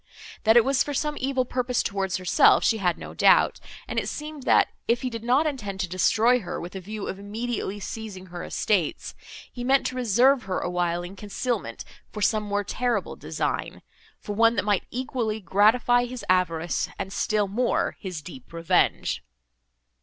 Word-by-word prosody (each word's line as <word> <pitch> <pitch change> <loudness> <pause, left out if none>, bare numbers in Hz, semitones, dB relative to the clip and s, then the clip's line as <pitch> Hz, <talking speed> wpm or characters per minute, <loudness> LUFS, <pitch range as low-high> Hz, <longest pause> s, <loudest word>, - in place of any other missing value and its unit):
That 220 +2 +6
it 235 - +6
was 270 0 +2
for 290 - -4
some 300 +2 -1
evil 260 -1 0
purpose 250 0 -1
towards 195 -2 -1
herself, 185 -1 +4
she 225 - +2
could 180 -3 +1
not - - -10
doubt; - - +5 0.3
and - - -1
it - - -3
seemed, 300 -1 -6
that, - - +4 0.2
if 235 +2 +1
he 255 - -2
did 230 -1 -6
not 255 +6 +3
intend 215 -10 -3
to 185 - -1
destroy 220 +7 +3
her, 185 - -5
with 175 +3 -8
a - - -3
view 210 +2 -6
of 195 - -5
immediately 210 0 -4
seizing 205 -2 -7
her 175 -1 -8
estates, 185 -8 -1 0.4
he 245 - -6
meant 270 +2 +3
to 255 - -2
reserve 250 +3 +3
her 185 -1 -2
a 175 - -3
while 175 -1 0
in 180 +2 -8
concealment, 205 - -3 0.3
for 210 - -4
some 215 0 +2
more 205 -1 -1
terrible 245 +4 -1
design, - - -3 0.4
for 205 - -5
one 230 +2 +4
that - - 0
might 205 -3 +1
equally 240 -3 -2
gratify 220 +6 +3
his 245 -3 -7
avarice 175 -2 +1
and 190 - -5
still 210 -1 +1
more 235 +5 0
his 180 -7 -6
deep 135 -7 -11
revenge. 165 0 +1
215 Hz, 185 wpm, -25 LUFS, 185-245 Hz, 0.4 s, That